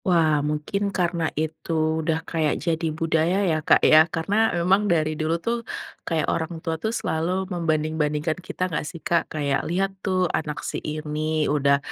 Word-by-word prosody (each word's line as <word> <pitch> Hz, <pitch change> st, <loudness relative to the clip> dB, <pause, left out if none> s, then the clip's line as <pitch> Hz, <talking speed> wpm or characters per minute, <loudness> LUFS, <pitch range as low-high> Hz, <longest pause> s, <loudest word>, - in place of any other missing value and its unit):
Wah 160 Hz, -5 st, +3 dB
mungkin 150 Hz, +7 st, -1 dB
karena 175 Hz, -4 st, 0 dB
itu 160 Hz, 0 st, -1 dB
udah 160 Hz, +1 st, -1 dB
kayak 160 Hz, -3 st, 0 dB
jadi 165 Hz, -1 st, 0 dB
budaya 165 Hz, +3 st, +1 dB
ya, 160 Hz, -3 st, +1 dB
Kak, -, -, +4 dB
ya. 155 Hz, +2 st, +7 dB
Karena 200 Hz, +8 st, +1 dB
memang 195 Hz, +4 st, +3 dB
dari 155 Hz, -2 st, +2 dB
dulu 155 Hz, +2 st, 0 dB
tuh 235 Hz, +7 st, -2 dB, 0.5 s
kayak 160 Hz, -3 st, +1 dB
orang 165 Hz, +1 st, -2 dB
tua 160 Hz, 0 st, -4 dB
tuh 220 Hz, -, 0 dB
selalu 185 Hz, -3 st, -1 dB
membanding-bandingkan 155 Hz, -2 st, 0 dB
kita 185 Hz, 0 st, -3 dB
nggak 170 Hz, -4 st, -2 dB
sih, 150 Hz, -, -7 dB
Kak? 170 Hz, +1 st, 0 dB
Kayak, 140 Hz, -3 st, 0 dB
“Lihat 190 Hz, +3 st, 0 dB
tuh 185 Hz, -2 st, +1 dB
anak 150 Hz, -2 st, -3 dB
si -, -, -3 dB
ini 155 Hz, 0 st, -2 dB
udah, 140 Hz, -1 st, +3 dB
160 Hz, 165 wpm, -24 LUFS, 155-175 Hz, 0.5 s, ya